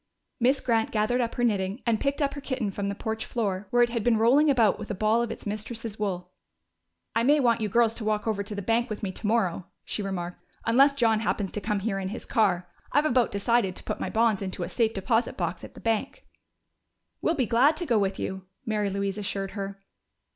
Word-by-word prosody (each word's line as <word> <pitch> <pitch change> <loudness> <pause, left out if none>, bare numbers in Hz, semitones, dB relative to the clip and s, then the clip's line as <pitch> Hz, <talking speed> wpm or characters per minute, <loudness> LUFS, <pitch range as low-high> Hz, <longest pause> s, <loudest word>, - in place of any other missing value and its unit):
Miss 260 +3 +3
Grant 225 -2 +1
gathered 225 +3 +1
up 235 -1 -2
her 245 - -1
knitting 200 0 0
and 230 -2 +2
picked 280 +1 0
up 280 - 0
her 285 - -6
kitten 260 -7 -2
from 200 +1 -3
the 200 - -3
porch 220 +2 -3
floor, 205 -4 -2
where 245 -1 +4
it 240 - +1
had 230 -3 -1
been 235 -1 +3
rolling 265 +7 +5
about 235 -7 +3
with - - -7
a 205 - -2
ball 215 +4 +2
of 235 - -1
its - - -7
mistress's 215 +1 -5
wool. 180 -3 -3 0.8
"I 230 - +3
may 290 +5 +4
want 235 -4 +3
you 215 - 0
girls 230 +1 +3
to 230 - -5
walk 215 0 0
over 215 -3 0
to 205 +1 -5
the 200 - -4
bank 230 +4 +1
with 215 0 -5
me 195 - -1
tomorrow," 200 -4 0 0.2
she - - -2
remarked. 180 -3 -4 0.2
"Unless 270 +5 +5
John 225 -5 +3
happens 205 -3 -1
to 210 - -4
come 210 -2 -1
here 195 -2 -1
in 190 - -3
his 220 - -6
car. 185 -7 +1 0.2
I've 290 +2 +3
about 250 -5 +3
decided 200 -2 +1
to - - -7
put - - -4
my - - -2
bonds 220 -3 +2
into 185 -2 -3
a 170 - -4
safe 225 -2 +1
deposit 225 +4 0
box 175 -1 -2
at - - -10
the - - -10
bank." 230 +5 -2 1.0
"We'll 330 - +1
be 265 -5 +1
glad 265 +8 +4
to 345 - -2
go 235 -7 +3
with 195 -1 0
you," 190 0 -5 0.2
Mary 210 -2 0
Louise 200 +1 -2
assured 195 -1 -3
her. 195 0 -6
220 Hz, 235 wpm, -27 LUFS, 200-240 Hz, 1.0 s, rolling